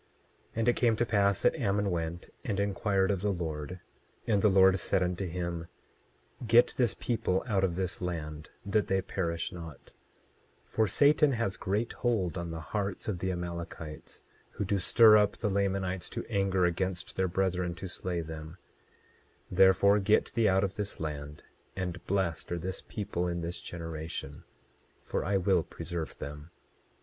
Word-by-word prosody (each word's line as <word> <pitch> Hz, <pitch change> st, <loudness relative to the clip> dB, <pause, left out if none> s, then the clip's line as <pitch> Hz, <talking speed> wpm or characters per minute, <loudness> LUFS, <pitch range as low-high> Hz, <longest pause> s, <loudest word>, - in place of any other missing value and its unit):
27:11 -, -, -37 dB, 0.5 s
And 115 Hz, +1 st, 0 dB
it 120 Hz, -, +4 dB
came 115 Hz, -3 st, +3 dB
to 120 Hz, -, +1 dB
pass 100 Hz, -3 st, +2 dB
that -, -, +4 dB
Ammon 105 Hz, -, 0 dB
went 85 Hz, 0 st, -3 dB
and 100 Hz, -, -2 dB
inquired 100 Hz, -1 st, +1 dB
of 95 Hz, -3 st, -1 dB
the 105 Hz, 0 st, +1 dB
Lord, 80 Hz, -1 st, -4 dB, 0.4 s
and 105 Hz, -3 st, +2 dB
the 105 Hz, -, +5 dB
Lord 95 Hz, 0 st, +5 dB
said 90 Hz, -, +1 dB
unto 90 Hz, +1 st, -2 dB
him: 85 Hz, -1 st, -4 dB, 0.7 s
27:12 120 Hz, -, -5 dB
Get 115 Hz, +2 st, +6 dB
this 120 Hz, -5 st, +2 dB
people 100 Hz, -6 st, 0 dB
out 100 Hz, -5 st, +1 dB
of 90 Hz, -3 st, +1 dB
this 95 Hz, 0 st, -3 dB
land, 80 Hz, -4 st, -4 dB, 0.2 s
that 105 Hz, +1 st, +1 dB
they 95 Hz, -1 st, +1 dB
perish 85 Hz, -3 st, -2 dB
not; 85 Hz, -5 st, -10 dB, 0.7 s
for 110 Hz, -1 st, +1 dB
Satan 145 Hz, +6 st, +4 dB
has 115 Hz, -5 st, -1 dB
great 100 Hz, +6 st, -1 dB
hold 110 Hz, -8 st, 0 dB
on 85 Hz, -2 st, -4 dB
the 80 Hz, 0 st, -5 dB
hearts 100 Hz, -2 st, -2 dB
of 100 Hz, -5 st, -2 dB
the 95 Hz, +1 st, -1 dB
Amalekites, 85 Hz, -3 st, -6 dB, 0.3 s
who 105 Hz, -, -2 dB
do 100 Hz, +1 st, +1 dB
stir 110 Hz, +3 st, +7 dB
up 105 Hz, -1 st, +2 dB
the 105 Hz, -, -1 dB
Lamanites 95 Hz, -2 st, 0 dB
to -, -, -5 dB
anger 95 Hz, -4 st, +2 dB
against 90 Hz, +1 st, -2 dB
their 95 Hz, -, +1 dB
brethren 90 Hz, -1 st, 0 dB
to 90 Hz, +3 st, -6 dB
slay 90 Hz, -1 st, -3 dB
them; 80 Hz, +1 st, -8 dB, 0.9 s
therefore 95 Hz, +2 st, +5 dB
get 105 Hz, +2 st, +2 dB
thee 115 Hz, -2 st, +3 dB
out 95 Hz, +1 st, +3 dB
of 100 Hz, 0 st, -2 dB
this 105 Hz, -1 st, -4 dB
land; 75 Hz, -1 st, -5 dB, 0.3 s
and 90 Hz, -2 st, -4 dB
blessed 90 Hz, -5 st, -1 dB
are 85 Hz, -, 0 dB
this 90 Hz, +2 st, -4 dB
people 100 Hz, -4 st, -3 dB
in 85 Hz, 0 st, -2 dB
this 85 Hz, +1 st, -4 dB
generation, 80 Hz, -4 st, -6 dB, 0.5 s
for -, -, -3 dB
I 100 Hz, +3 st, +1 dB
will 95 Hz, -1 st, +3 dB
preserve 85 Hz, -1 st, -5 dB
them. 75 Hz, +2 st, -7 dB
95 Hz, 170 wpm, -30 LUFS, 85-100 Hz, 0.9 s, stir